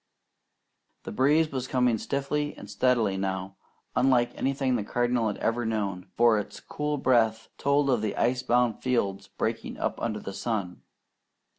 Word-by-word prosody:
The - - -6
breeze 150 +7 +3
was 130 -2 -3
coming 125 -4 +2
stiffly 145 +3 -2
and - - -10
steadily 105 -1 +1
now, 95 0 -3 0.4
unlike 125 -1 +3
anything 135 -1 0
the 110 - -1
Cardinal 120 0 +1
ever 115 +2 0
had 110 - -1
known, 100 -5 -2
for 115 -2 +5
its 105 - -7
cool 150 0 -3
breath 115 -4 +2
told 140 0 +2
of 125 -5 +2
ice 120 +4 +1
bound 125 -2 +1
fields 100 -6 0
breaking - - -3
up - - -2
under 110 -2 -2
the 100 - -7
sun. 100 -4 -3
120 Hz, 150 wpm, -27 LUFS, 105-130 Hz, 0.4 s, for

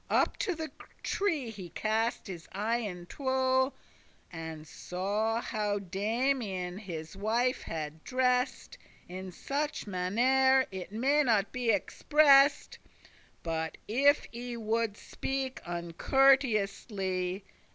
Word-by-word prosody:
Up - - +2
to 370 - -1
the 320 -1 -5 0.3
tree 315 - 0
he 190 -5 -8
cast 220 +4 -1
his 175 -4 -8
eyen 205 -3 -2
two, 260 +3 +1 0.6
And 160 -1 -7
saw 210 +8 -2
how 210 -3 -1
Damian 200 -1 -1
his 165 -5 -7
wife 230 +5 +1
had 155 -1 -5
dress'd, 255 - 0 0.3
In 185 +1 -7
such 290 - -3
mannere, 255 +8 +3
it 190 0 -6
may 270 +7 +2
not 220 -7 +2
be 250 -2 -1
express'd, 280 +7 +4 0.6
*But 160 -1 -3
if* 280 +6 +4
I 240 +1 -5
woulde 225 -1 -1
speak 270 -1 -4
uncourteously. 195 -1 +1
220 Hz, 105 wpm, -30 LUFS, 185-260 Hz, 0.6 s, express'd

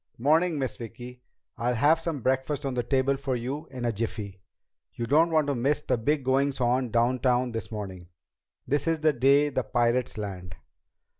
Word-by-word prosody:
"'Morning, 160 +6 +2
Miss 130 -2 -3
Vicki. 125 +2 -9 0.4
I'll 120 +1 0
have 150 +7 +4
some 165 -4 -3
breakfast 130 +2 0
on 135 - -2
the 125 - 0
table 135 +2 +1
for 135 -2 -2
you 135 +6 -4
in 130 -2 -5
a 120 - +1
jiffy. 105 -3 -5 0.5
You 120 - -3
don't 155 +7 +4
want 155 -2 +2
to 140 - 0
miss 140 +4 0
the 130 - 0
big 140 +5 0
goings 135 +2 +1
on 125 0 +1
downtown 125 +2 +1
this 115 -1 -5
morning. 95 -5 -7 0.6
This 145 +2 0
is 165 -1 +1
the 155 -1 +3
day 140 +4 +4
the 130 -2 -1
pirates 120 +1 0
land." 90 -4 -6
130 Hz, 180 wpm, -27 LUFS, 120-145 Hz, 0.6 s, have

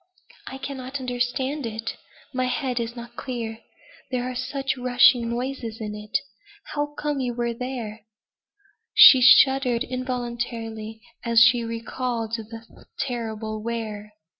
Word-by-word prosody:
"I 265 - -6
cannot 270 0 -5
understand 255 +2 -2
it. 225 0 -4 0.4
My 255 0 0
head 250 0 -1
is 235 +1 -4
not 235 0 -9
clear. 230 -4 -5 0.5
There 250 -2 -1
are 255 0 -3
such 270 +2 -2
rushing 245 -1 +4
noises 240 -2 -4
in 210 -2 -4
it. 210 0 -2 0.6
How 295 0 -2
came 295 -2 -1
you 245 -2 -2 0.2
there?" 230 -3 -5 0.9
She 260 - +10
shuddered 260 -1 +6
involuntarily 235 -3 -4 0.2
as 235 -1 +4
she 240 0 +5
recalled 230 0 -3
the 225 0 -11
terrible 220 -4 -3
where. 215 -2 -5
240 Hz, 120 wpm, -24 LUFS, 225-255 Hz, 0.9 s, She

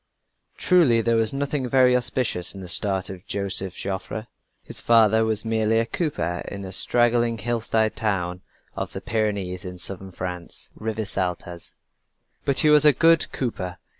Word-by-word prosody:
Truly 155 -11 +4
there 115 +1 +1
was 115 -1 +3
nothing 140 -1 -2
very 125 0 +4
auspicious 120 -7 0
in 95 - -8
the 90 - -8
start 95 +1 0
of 95 -1 -10
Joseph 95 -2 -2
Joffre. 100 +3 -5 0.4
His - - -7
father 110 -1 +4
was 110 -1 -1
merely 110 0 +1
a 115 - +2
cooper 90 - -2
in 100 -1 -7
a 95 - -7
straggling 120 +3 +3
hillside 110 -1 0
town 90 -4 -2 0.3
of - - -5
the - - -6
Pyrenees 100 -5 -2
in 90 -1 -7
Southern 95 +2 -4
France, 90 -1 -6
Rivesaltas 95 -6 -4 0.7
but 140 - +2
he 155 - +4
was 150 -1 +6
a 150 -1 +8
good 165 +4 +3
cooper. 90 -8 -4
110 Hz, 155 wpm, -23 LUFS, 95-120 Hz, 0.7 s, a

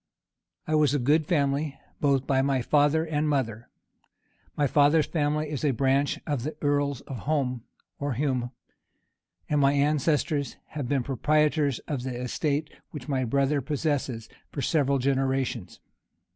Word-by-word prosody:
I 155 - -2
was 150 -2 +3
of 145 - 0
a - - -4
good 150 +2 +3
family, 140 -2 0 0.2
both 140 -2 +2
by 135 -1 +2 0.2
father 150 +4 +3
and 155 -1 0
mother: 120 -5 -2 0.9
my 145 - +3
father's 145 +3 +4
family 150 -1 0
is 145 -1 -4
a 150 - +3
branch 135 +2 +2
of 145 -6 -1
the 150 +5 -4
earl 145 -1 +1
of 130 -4 -6
Home's, 135 -5 -1 0.4
or 145 -1 -1
Hume's; 130 -2 -1 1.0
and 150 -1 +1
my 140 0 +4
ancestors 145 0 +1
had 145 -5 -5
been 135 -3 +1
proprietors 145 +1 +1
of 140 -5 -2
the 125 -1 -4
estate 145 +4 -2 0.2
which 140 -5 -8
my 135 -2 0
brother 140 +4 +1
possesses, 140 -5 -2 0.2
for 140 - -4
several 140 -3 +2
generations. 135 -4 -1
140 Hz, 145 wpm, -27 LUFS, 135-150 Hz, 1.0 s, father's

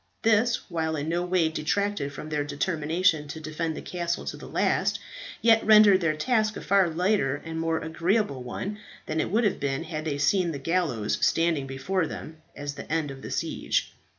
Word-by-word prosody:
This, 225 +1 +3
while 160 -3 -1
it 150 - -2
in 150 - -3
no 170 +1 0
way 180 -2 +2
detracted 160 0 -1
from 150 +2 -8
their 150 -1 0
determination 155 +2 0
to 155 +2 -6
defend 155 +1 -3
the - - -7
castle 175 -1 -3
to - - -4
the - - -10
last, - - +1 0.4
yet 225 -1 +5
rendered 210 -3 +7
their 160 -2 +1
task 215 +4 +1
a - - -6
far 195 -3 +3
lighter 165 -5 +1
and 160 0 -4
more 165 0 0
agreeable 165 - 0
one 195 +12 -5 0.3
than 155 0 -2
it - - 0
would 225 +5 +2
have 205 - +1
been 135 -1 -1
had 155 -2 -5
they 145 -3 -1
seen 175 +3 +2
the - - -4
gallows 140 -8 0
standing 165 -5 +2
before 160 +7 -1
them 160 +1 -8 0.2
as 145 0 -5
the - - -9
end 155 -3 0
of 135 -1 -10
the - - -7
siege. - - -1
165 Hz, 200 wpm, -26 LUFS, 150-190 Hz, 0.4 s, rendered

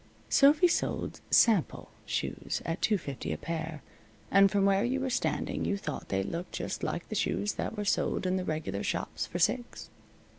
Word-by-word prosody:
Sophy 300 +5 +6
sold 345 - -1
"sample" 215 -8 +3 0.2
shoes - - -2
at 165 +2 -3
two 215 - +3
fifty 140 -7 -5
a - - -2
pair, 160 -2 -5 0.5
and 195 0 +6
from 200 0 +2
where 195 0 +3
you 255 +3 0
were 265 -1 -2
standing - - -1
you 200 - 0
thought 150 -7 -6
they 95 0 0
looked 170 - -5
just - - -4
like - - -3
the - - -4
shoes 100 +5 0
that 215 - -4
were 210 - -2
sold 195 - 0
in 185 0 +1
the 185 - -1
regular 155 - -3
shops - - -2
for 175 - -4
six. 240 +8 -1
185 Hz, 185 wpm, -30 LUFS, 155-215 Hz, 0.5 s, Sophy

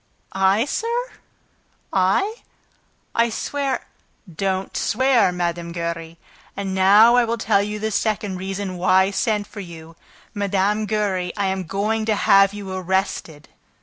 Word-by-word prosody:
"I, 195 +4 +3
sir? 470 - -2 0.8
I?... 195 - +1 0.8
I 230 0 +2
swear 275 +4 -3 0.2
..." 175 -6 -20
"Don't 190 0 -2
swear, 250 -4 +2
Mme. 170 -1 -3
Giry!... 170 -1 -5 0.4
And 195 -1 -3
now 205 +5 +6
I 245 - +5
will 230 0 -1
tell 215 -3 +2
you 210 +1 -3
the 220 +1 -3
second 210 -2 -1
reason 190 0 -4
why 185 +1 +4
I 195 - -1
sent 210 0 0
for 205 +1 -11
you. 165 -3 -10 0.4
Mme. 205 +1 0
Giry, 200 -4 -1
I 200 - 0
am 190 -1 -2
going 215 +5 -1
to 215 -1 +1
have 195 -1 +5
you 200 -2 -7
arrested." 185 -4 -2
195 Hz, 145 wpm, -21 LUFS, 185-215 Hz, 0.8 s, now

